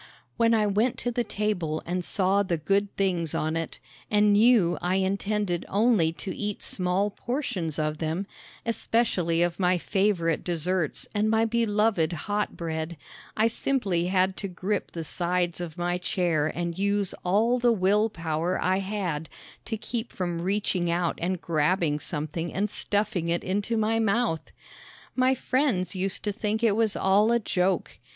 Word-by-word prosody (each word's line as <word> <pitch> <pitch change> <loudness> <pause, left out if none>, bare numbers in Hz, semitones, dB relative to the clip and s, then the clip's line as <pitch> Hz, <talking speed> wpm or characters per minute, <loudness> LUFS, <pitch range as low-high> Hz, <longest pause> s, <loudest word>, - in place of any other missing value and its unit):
When 230 0 +3
I 215 -1 +3
went 210 +5 +1
to 245 - -2
the 240 0 0
table 195 -8 -2
and 180 +1 -2
saw 195 +2 +2
the 180 -4 0
good 200 +6 +1
things 180 -5 0
on 155 +1 -1
it, 165 -1 -3 0.3
and 210 0 +4
knew 210 -5 +4
I 180 +1 +1
intended 195 -1 0
only 205 -6 +3
to 185 +2 -5
eat 210 -1 -3
small 185 +3 0
portions 195 - -3
of 155 0 -1
them, 165 +4 -2 0.4
especially 195 -8 +1
of 175 +1 -1
my 180 -1 +3
favorite 190 -3 +1
desserts 175 -1 -1
and 210 0 +1
my 225 +1 +3
beloved 215 -6 +1
hot 205 +6 -2
bread, 160 0 -4 0.4
I 220 - +4
simply 215 -7 0
had 185 0 +2
to 200 - -3
grip 190 +3 -3
the 165 - -4
sides 175 +1 -1
of 165 -3 -6
my 175 +1 -1
chair 175 -4 +1
and 170 +1 -3
use 200 -1 0
all 220 +7 +2
the 240 0 +4
will 210 +1 +3
power 165 -1 -2
I 185 +1 +1
had 190 -6 -3 0.4
to 220 - -3
keep 230 +2 -4
from 175 -2 -3
reaching 185 -2 0
out 170 0 0
and 180 +1 -1
grabbing 160 -1 +1
something 155 +1 -3
and 205 +1 -1
stuffing 205 -5 -1
it 170 +1 0
into 205 +5 -1
my 220 +1 +1
mouth! 220 -7 +1 0.7
My 255 +1 +3
friends 255 - 0
used 190 +1 -2
to 210 - 0
think 215 +1 -2
it 220 -3 +4
was 220 -2 +1
all 205 +4 +3
a 235 - +4
joke. 190 -5 -1
190 Hz, 160 wpm, -27 LUFS, 170-210 Hz, 0.7 s, and